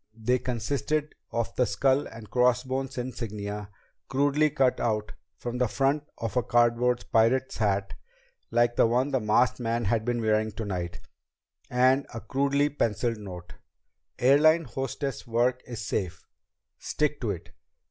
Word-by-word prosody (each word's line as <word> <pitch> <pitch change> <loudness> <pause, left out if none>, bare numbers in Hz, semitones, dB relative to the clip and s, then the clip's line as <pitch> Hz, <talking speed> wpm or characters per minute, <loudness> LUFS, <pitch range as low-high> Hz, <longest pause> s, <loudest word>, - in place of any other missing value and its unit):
They 125 +3 +1
consisted 140 +6 -2 0.2
of 115 0 -2
the 125 - +3
skull 135 +1 +2
and 115 -2 -11
crossbones 130 +3 +1
insignia 105 -5 -5 0.4
crudely 145 +3 +2
cut 135 -3 +1 0.6
from 120 0 -4
the 125 - +3
front 140 +5 +1
of 115 0 -4
a 125 - +3
cardboard 120 +1 +2
pirate's 120 +4 +2
hat, 100 -3 0 0.6
like 120 0 +2
the - - +5
one 125 +5 +1
the 135 - +2
masked 125 +4 +2
man 115 -1 -1
had 110 +2 +1
been 120 +1 -1
wearing 110 -1 +1
tonight, 95 -5 -4 0.7
and 130 +2 +3
a - - -3
crudely 140 +5 +1
penciled 115 -4 -1
note: 90 -3 -9 0.6
"_Airline 155 +6 +5
hostess 135 +1 -4
work 120 +2 +1
is 115 -4 -6
safe! 90 -4 -3 0.5
Stick 150 -1 -1
to 115 - -1
it! 95 -5 -5
120 Hz, 135 wpm, -27 LUFS, 110-135 Hz, 0.7 s, the